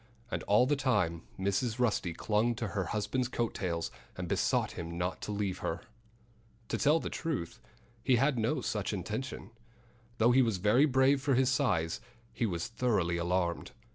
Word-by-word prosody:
And - - -1
all 105 +5 +5
the 145 +3 +2
time 90 - +1 0.2
Mrs. 100 +5 0
Rusty 115 -8 +1
clung 110 +7 +1
to 115 -2 -3
her 95 -3 -2
husband's 110 +6 -1
coat 120 -2 -1
tails 85 -3 -2 0.3
and 90 -1 -4
besought - - +1
him 85 +1 -6
not 90 +1 -2
to - - -4
leave 100 -3 -2
her. 80 - -3 0.9
To - - -1
tell 150 +3 +4
the - - -5
truth, 150 - -3 0.4
he 130 - +4
had 135 +1 +2
no 125 +5 0
such 105 -3 -2
intention. 110 +7 -4 0.7
Though 115 +2 +5
he 130 +2 +6
was 115 -6 +1
very 105 +9 +4
brave 135 0 +3
for 140 -1 +2
his 130 +1 +3
size, 90 - +1 0.3
he 115 +1 0
was 85 -2 -2
thoroughly 105 -8 0
alarmed. 85 0 -1
110 Hz, 170 wpm, -31 LUFS, 90-130 Hz, 0.9 s, he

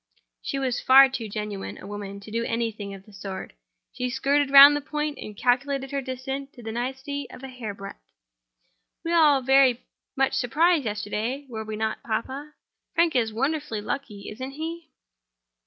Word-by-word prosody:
She 275 - -3
was 260 -3 -1
far 270 +1 +8
too 235 -5 -5
genuine 210 -1 -5
a - - -10
woman 200 0 -6
to 210 - -11
do 230 +1 -1
anything 225 -4 -3
of 195 0 -14
the 210 - -17
sort. 195 -1 -7 0.4
She 250 -1 -2
skirted 275 +2 +1
round 280 +1 +10
the 290 - -1
point 300 -1 -3
and 210 -1 -8
calculated 270 +3 0
her 280 -1 -1
distance 265 +1 -5
to 245 - -12
the 220 - -4
nicety 265 +4 -4
of 250 - -12
a - - -5
hair 245 -6 -6
breadth. 195 - -9 1.0
"We 335 - -1
were 340 - +4
all 290 -5 +5
very 265 -2 +4 0.3
much 270 -1 +2
surprised 285 +5 +2
yesterday—were 220 +3 -3
we 215 0 -5
not, 220 0 -2
papa? 265 +7 -4 0.4
Frank 335 -3 +3
is 230 -3 +2
wonderfully 270 -1 -1
lucky, 210 -3 -5
isn't 260 +5 -6
he?" 320 +2 -6
260 Hz, 170 wpm, -25 LUFS, 220-280 Hz, 1.0 s, round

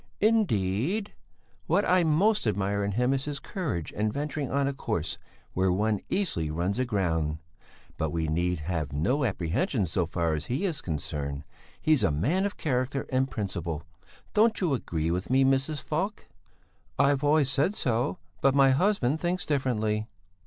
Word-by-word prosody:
"Indeed? 195 - +1 0.5
What - - +3
I 180 0 +4
most 180 - +3
admire 100 0 0
in 100 0 -1
him 125 +5 +2
is 135 0 -1
his 145 -1 -3
courage 145 - -4
in 105 +1 -1
venturing 145 +1 -3
on 140 0 +1
a 140 - -1
course 80 - -3 0.3
where 95 0 +2
one 105 +2 +1
easily 155 - -1
runs 90 +8 -1
aground; 85 -10 0 0.6
but 80 - 0
we 80 +1 -1
need 85 +2 0
have 75 -4 -3
no 125 - +1
apprehensions 100 - 0
so 90 -2 +1
far 85 -1 0
as 75 0 -3
he 135 +11 -1
is 170 -6 -2
concerned; 70 -3 -4 0.4
he's 155 -3 +3
a - - +4
man 145 - +1
of 200 - -8
character 135 -1 -1
and 130 +1 +2
principle. 85 - -3 0.5
Don't 220 +1 +4
you 175 -7 +1
agree 85 -10 -1
with 90 +2 -2
me, 135 +1 +4
Mrs. 135 +3 +1
Falk?" 190 +7 -2 0.7
"I've 140 0 +3
always 145 -2 +3
said 145 +9 +1
so, 125 - 0 0.2
but 135 0 +4
my 135 -1 +6
husband 155 -2 +2
thinks 180 +1 -1
differently." 110 -7 0
125 Hz, 160 wpm, -28 LUFS, 90-150 Hz, 0.7 s, my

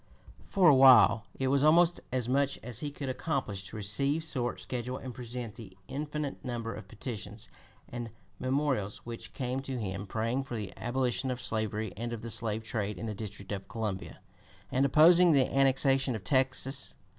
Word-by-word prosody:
For 190 -3 +3
a - - +9
long 130 - +4
while 115 -4 +7
it 130 -1 0
was 140 +1 +3
almost 170 +3 +5
as 125 -2 -1
much 140 +2 +1
as 120 -1 -4
he 150 - -3
could 145 -1 -6
accomplish 130 -8 -2
to 105 - -9
receive, 140 +10 0
sort, 125 -6 -2
schedule, 125 +1 -4
and 130 -2 -7
present 120 -1 -6
the 105 -5 -12
infinite 145 0 -4
number 120 -2 -4
of 105 -2 -9
petitions 105 -1 -7 0.4
and 120 -1 -6 0.3
memorials 130 -6 -1
which 115 -1 -7
came 130 0 -2
to 135 -1 -4
him 100 -2 -4
praying 115 +6 -1
for 125 - -5
the 105 -4 -5
abolition 125 -1 -1
of 125 -1 -2
slavery 110 -2 -2
and 120 +2 -4
of 115 - -6
the 115 - -3
slave 110 -1 -1
trade 105 -2 -3
in - - -5
the 110 - -3
District 100 -2 -8
of 100 -1 -4
Columbia, 105 -5 -4 0.5
and 135 +2 +3
opposing 170 +4 +7
(p. 140 - +5
253) - - +5
the 135 - +4
annexation 135 -1 +3
of 105 - -6
Texas. 135 +2 +1
125 Hz, 190 wpm, -30 LUFS, 110-135 Hz, 0.5 s, a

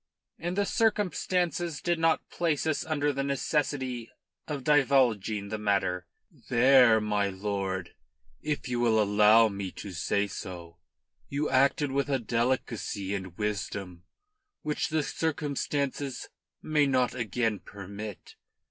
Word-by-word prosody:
"And 175 +3 -3
the 200 - +2
circumstances 180 - 0
did 175 -1 0
not 165 -1 +2
place 165 -4 0
us 155 -3 0
under 145 -2 0
the 140 - -2
necessity 135 -3 -1 0.4
of 145 -4 -4
divulging 125 -8 +2
the 110 - -3
matter." 95 -4 0 0.4
"There, 125 -2 +6
my 105 -2 0
lord, 95 -2 -3 0.5
if 150 -2 -2
you 120 -1 -1
will 115 -2 +3
allow 105 +2 +6
me 100 -2 -4
to 100 - -8
say 100 +3 0
so, 85 -4 -8 0.5
you 145 +2 -1
acted 140 +2 +3
with 140 +1 0
a 135 - +2
delicacy 115 -4 -1
and 95 -3 -5
wisdom 100 -4 -3 0.6
which 150 -1 -1
the 155 -1 +1
circumstances 140 -3 -2 0.3
may 150 -2 +2
not 130 -2 +2
again 115 -2 -1
permit. 100 +1 -9
125 Hz, 125 wpm, -28 LUFS, 100-145 Hz, 0.6 s, There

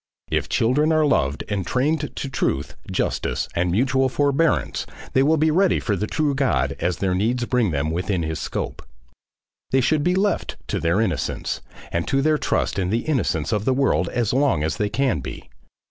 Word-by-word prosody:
If - - 0
children 145 +7 +2
are 155 -1 +3
loved 70 - +1
and 100 -2 -1
trained 150 - -1
to - - -4
truth, 100 - -2 0.2
justice, - - -1
and 85 0 0
mutual 130 +6 +2
forbearance, 145 +4 +1 0.3
they 130 - +4
will 155 +4 +4
be 155 +1 +3
ready 185 +4 +3
for 105 - -1
the 105 +3 -2
true 150 +2 0
God 70 - +1
as 90 0 0
their 95 -2 0
needs 120 +6 0
bring 120 -4 +1
them 75 0 -1
within 90 +1 -1
his 80 0 -3
scope. - - -4 0.9
They 135 - +3
should 145 +3 +2
be 180 +2 +2
left 200 +2 0
to - - -1
their 85 +6 +2
innocence, 115 - -2 0.3
and 85 0 -1
to 135 0 +1
their 155 0 +3
trust - - 0
in 90 -1 0
the 115 +4 0
innocence 115 - 0
of 105 -2 0
the 130 +3 +1
world, 135 -1 +2
as 120 -3 0
long 135 - +2
as 80 - -1
they 105 -2 0
can 120 - +1
be. 65 - -8
125 Hz, 190 wpm, -23 LUFS, 90-145 Hz, 0.9 s, they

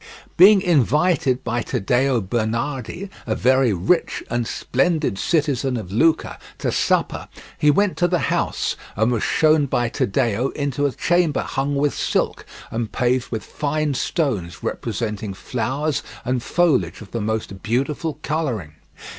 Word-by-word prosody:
Being 195 +2 +7
invited 150 - +2
by 120 0 -1
Taddeo 125 +4 +1
Bernardi, 115 - -2 0.2
a 110 - 0
very 130 0 +3
rich 95 - 0
and 120 -1 0
splendid 140 - 0
citizen 140 -5 0
of 100 -5 -7
Luca, 160 +10 +2 0.2
to - - -1
supper, - - 0 0.3
he 150 - +3
went 200 +6 +2
to 175 - +3
the 175 0 +1 0.2
house - - -1 0.2
and 110 +4 +2
was 115 -3 0
shown 155 -2 +3
by 120 -2 0
Taddeo 120 +3 0
into 145 -1 0
a - - -2
chamber 175 0 +1
hung 140 +1 -2
with 145 +1 +1
silk - - -1 0.2
and 115 -1 -3
paved 125 0 0
with 110 -2 -3
fine 150 0 -1
stones 125 - -2
representing 105 -2 -3
flowers 135 +8 -2 0.2
and 125 0 0
foliage 130 - +1
of 100 - -12
the 115 - -3
most 105 -3 -3
beautiful 140 +6 -1
colouring. 130 - -2
130 Hz, 140 wpm, -21 LUFS, 115-150 Hz, 0.3 s, Being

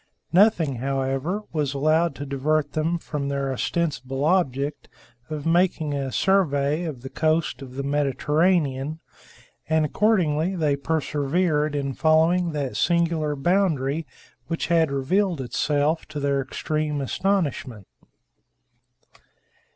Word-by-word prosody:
Nothing, 175 - +4
however, 135 - -2
was 145 -3 -1
allowed 155 +2 +2
to 145 - -6
divert 145 +2 0
them 160 +2 0
from 150 -4 -4
their 140 -1 -1
ostensible 135 -2 -2
object 145 -5 0 0.4
of 150 -2 -5
making 165 -3 +2
a 135 -2 -2
survey 155 -3 +1
of 135 -7 -6
the 135 - -6
coast 155 -1 0
of 130 -2 -10
the 140 - -3
Mediterranean, 145 +1 +1 0.7
and 160 -1 +3
accordingly 180 -2 +1
they 150 -5 +1
persevered 150 +1 0
in 140 -1 -2
following 165 +4 +3
that 140 -4 -3
singular 165 -3 +1
boundary 160 -2 0 0.4
which 165 +1 -3
had 165 -2 +3
revealed 175 +6 0
itself 145 +5 0
to 155 -1 -6
their 140 -1 +1
extreme 150 +2 -2
astonishment. 140 - -1
150 Hz, 115 wpm, -24 LUFS, 140-165 Hz, 0.7 s, Nothing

